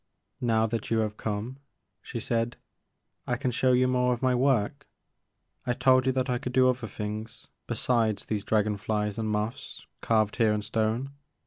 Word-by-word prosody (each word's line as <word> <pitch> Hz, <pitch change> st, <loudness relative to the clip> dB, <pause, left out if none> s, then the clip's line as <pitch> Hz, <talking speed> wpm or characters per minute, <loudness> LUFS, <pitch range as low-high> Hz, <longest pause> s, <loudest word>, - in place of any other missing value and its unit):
" -, -, -44 dB
Now 110 Hz, 0 st, +4 dB
that 115 Hz, -1 st, -3 dB
you 115 Hz, -, +2 dB
have 105 Hz, -1 st, -2 dB
come," 110 Hz, +6 st, -4 dB, 0.4 s
she -, -, -6 dB
said, 115 Hz, 0 st, -1 dB, 0.7 s
I 120 Hz, -, +1 dB
can 130 Hz, 0 st, -1 dB
show 130 Hz, +2 st, +2 dB
you 125 Hz, 0 st, +4 dB
more 125 Hz, 0 st, +2 dB
of 120 Hz, -, -11 dB
my 130 Hz, -1 st, +3 dB
work. 130 Hz, +1 st, +1 dB, 0.8 s
I 120 Hz, -, 0 dB
told 130 Hz, 0 st, +4 dB
you -, -, +4 dB
that 130 Hz, 0 st, 0 dB
I 125 Hz, -2 st, 0 dB
could 125 Hz, -, -5 dB
do 130 Hz, 0 st, +5 dB
other 125 Hz, -2 st, 0 dB
things 110 Hz, +2 st, -6 dB, 0.2 s
besides 115 Hz, -2 st, 0 dB
these 105 Hz, -2 st, -2 dB
dragon 105 Hz, -1 st, +1 dB
flies 105 Hz, 0 st, -2 dB
and 110 Hz, -1 st, -1 dB
moths 105 Hz, +6 st, -3 dB, 0.2 s
carved 110 Hz, -2 st, +1 dB
here 110 Hz, -3 st, +4 dB
in 105 Hz, 0 st, -2 dB
stone. 110 Hz, +5 st, -1 dB
115 Hz, 185 wpm, -28 LUFS, 110-125 Hz, 0.8 s, do